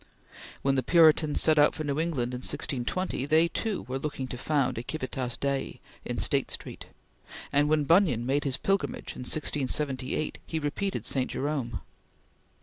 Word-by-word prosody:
When 135 - +3
the 135 - +2
Puritans 155 0 +4
set 155 -1 +4
out 145 - +5
for 155 - -3
New 145 0 -1
England 135 -7 -1
in 125 - -3
1620, 135 +4 -2
they 160 +2 +4
too 215 +4 -2
were 130 +2 -4
looking 135 -2 -4
to - - -4
found 135 -2 0
a - - -5
Civitas 130 -3 -3
Dei 140 -1 -2 0.2
in - - -4
State - - +1
Street; - - -6 0.7
and 145 +1 +3
when 155 -1 +3
Bunyan 160 - +3
made 140 +3 +1
his 135 -2 -1
Pilgrimage 215 +5 -1
in - - -10
1678, 140 0 -1
he 165 - -2
repeated 160 +6 -2
St. 130 -2 +1
Jerome. 135 -4 -2
145 Hz, 160 wpm, -28 LUFS, 130-155 Hz, 0.7 s, out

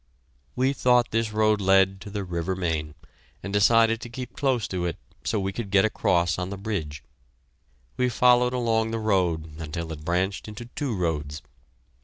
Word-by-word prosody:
We 130 +2 +2
thought 125 -3 +3
this 115 -1 0
road 110 -1 +2
led 95 0 +3
to 105 - -8
the 100 0 -4
river 90 0 -3
Main, 80 -4 -2 0.5
and 100 +2 -5
decided 115 +2 +4
to 120 - -7
keep 125 0 -7
close 130 -6 0
to 90 -2 -2
it 85 - -3 0.3
so 110 - 0
we 95 0 -2
could 115 -2 -5
get 95 0 +4
across 85 -5 +1
on 90 0 -3
the 100 - -5
bridge. 95 -8 -4 0.9
We 125 0 +2
followed 125 +1 +4
along 115 -2 +1
the 115 - -2
road 85 -7 0
until 80 +1 -5
it 75 -1 -7
branched 95 +5 -1
into 105 +2 -8
two 130 -1 -3
roads. 80 -4 -2
100 Hz, 175 wpm, -25 LUFS, 85-115 Hz, 0.9 s, decided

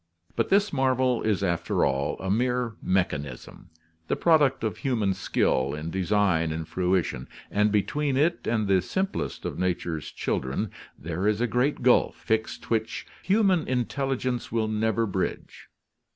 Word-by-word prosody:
But - - 0
this 200 -1 +3
marvel 130 -2 +2
is 105 -3 0
after 85 -3 +1
all 65 +1 -1
a 95 0 -2
mere 125 +1 0
mechanism, 75 -8 -2 0.4
the - - +1
product 150 -7 +3
of 110 - -1
human 110 -8 0
skill 70 -6 0
in 80 +2 -5
design 95 -3 +1
and 80 0 -4
fruition, 90 -6 -1 0.2
and 105 +1 +2
between 130 +8 0
it 160 +5 +1
and 110 -3 +1
the 95 -1 +4
simplest 190 - -3
of - - -4
nature's 85 -3 -2
children 70 +11 -2 0.3
there 85 +5 -3
is 105 0 +2
a 120 - +2
great 125 +4 0
gulf 125 0 +4
fixed 110 +1 -2
which 110 -1 -1 0.2
human 190 -4 +2
intelligence 130 0 -1
will 115 -1 0
never 110 +1 +1
bridge. 95 -3 -4
110 Hz, 145 wpm, -26 LUFS, 90-130 Hz, 0.4 s, the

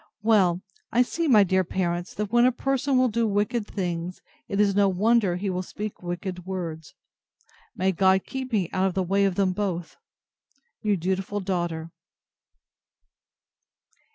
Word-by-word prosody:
Well! 190 -5 +3 0.3
I 245 - +4
see, 330 +6 -2
my 215 -7 +7
dear 190 0 +2
parents, 175 0 -2
that 210 -1 -3
when 240 +1 +5
a 255 - +5
person 270 +1 0
will 255 0 +4
do 230 0 0
wicked 205 +2 0
things, 175 -2 -3 0.3
it 200 - -2
is 205 -1 +4
no 200 0 +4
wonder 205 0 +2
he 195 +3 -3
will 180 0 -2
speak 210 +3 -6
wicked 180 +1 -5
words. 165 -5 -5 0.8
May 190 +1 +1
God 190 +1 +3
keep 260 -1 -5
me 200 -6 +1
out 190 +1 +2
of 185 - -3
the 190 - +1
way 195 +2 +2
of 195 -2 0
them 195 -1 +2
both! 180 -4 -3 0.8
Your 210 -2 +2
dutiful 190 +3 -2
DAUGHTER. 175 -4 -3
190 Hz, 155 wpm, -25 LUFS, 180-210 Hz, 0.8 s, my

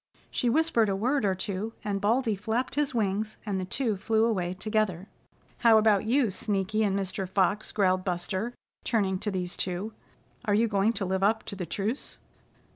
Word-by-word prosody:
She 245 - +1
whispered 255 -6 +3
a 195 - +1
word 245 +4 +1
or 190 -1 +2
two, 200 +3 -3
and 200 -2 -2
Baldy 225 +1 +2
flapped 220 +6 -2
his 290 -3 0
wings, 215 0 -1
and 200 -3 -1
the 185 - -3
two 220 +1 -1
flew 220 +3 +2
away 185 -6 0
together. 205 -2 -1 0.5
"How 230 -2 +6
about 215 -2 +4
you, 240 -1 +2
Sneaky 205 +2 0
and 200 -2 +1
Mr. 190 -1 -3
Fox?" 195 +2 +1
growled 185 -2 +2
Buster, 185 +6 -2 0.3
turning 195 -5 +1
to 210 - -1
these 180 -2 -3
two. 185 +4 -3 0.5
"Are 205 -2 +2
you 230 +2 +3
going 210 +1 +2
to 205 - -2
live 190 +1 -1
up 220 +3 +2
to - - -6
the 180 -3 -5
truce?" 215 +7 -3
205 Hz, 185 wpm, -28 LUFS, 190-225 Hz, 0.5 s, How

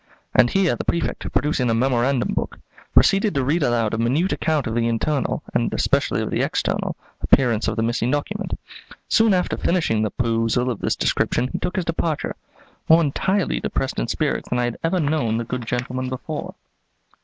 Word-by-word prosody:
and 125 -1 +5
here 195 -3 +2
the - - -4
Prefect, 170 - -2
producing 135 -3 +1
a 115 - +2
memorandum 125 +1 +1
book, - - -3 0.3
proceeded 195 +1 +4
to 135 - +1
read 155 +6 +1
aloud 115 -5 +1
a 115 - -1
minute 140 +11 +1
account 155 -4 0
of 110 - -2
the 115 0 +1
internal, 130 +5 -1
and - - +1
especially - - +1
of - - -4
the - - 0
external, - - -1 0.3
appearance 120 -5 +3
of 115 - -1
the 115 - 0
missing 120 +1 0
document. 145 +10 -2 0.5
Soon 225 -1 +4
after 180 -2 +1
finishing 160 -12 +1
the 110 - +1
perusal 115 +2 0
of 115 - -5
this - - 0
description 125 - 0
he - - -4
took 180 - -3
his 185 - -1
departure, 165 -2 -2 0.5
more 165 +1 +7
entirely 185 +5 0
depressed 135 0 -2
in - - -1
spirits 150 +5 -1
than 125 - 0
I 125 - +1
had 120 -1 -3
ever 170 +3 +1
known 145 -8 0
the 115 - -1
good 125 0 -5
gentleman 125 +1 -2
before. 130 -1 -5
130 Hz, 190 wpm, -22 LUFS, 115-160 Hz, 0.5 s, more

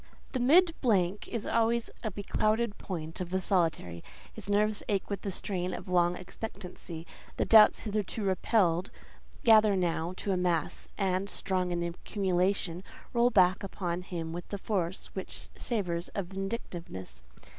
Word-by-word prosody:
The 260 - -1
mid 330 +8 +5
blank 200 -5 +2
is 230 -3 -4
always 230 0 +1
a 220 - 0
beclouded 215 +2 0
point 165 -4 -5
for 180 - -1
the 185 +2 -1
solitary: 165 - 0 0.3
his - - -8
nerves 210 +1 +2
ache 200 0 0
with 200 - -2
the 200 - -3
strain 185 -1 -2
of - - -8
long 175 -1 +3
expectancy; 180 -3 -7 0.3
the - - +1
doubts 215 -1 +7
hitherto 210 0 -2
repelled 185 -2 +2 0.5
gather 215 -3 +6
now 170 -1 0
to 200 - -2
a 185 - +2
mass 175 -3 -1
and—strong 190 -1 0
in 175 0 -1
accumulation—roll 185 +5 -1
back 185 -4 +4
upon 180 -3 -3
him 170 -3 -5
with 175 0 -7
a 200 - -2
force 185 -3 -2
which 190 - -6
savours 180 -7 -1
of 190 -4 -3
vindictiveness. 190 - -5
190 Hz, 145 wpm, -30 LUFS, 175-210 Hz, 0.5 s, doubts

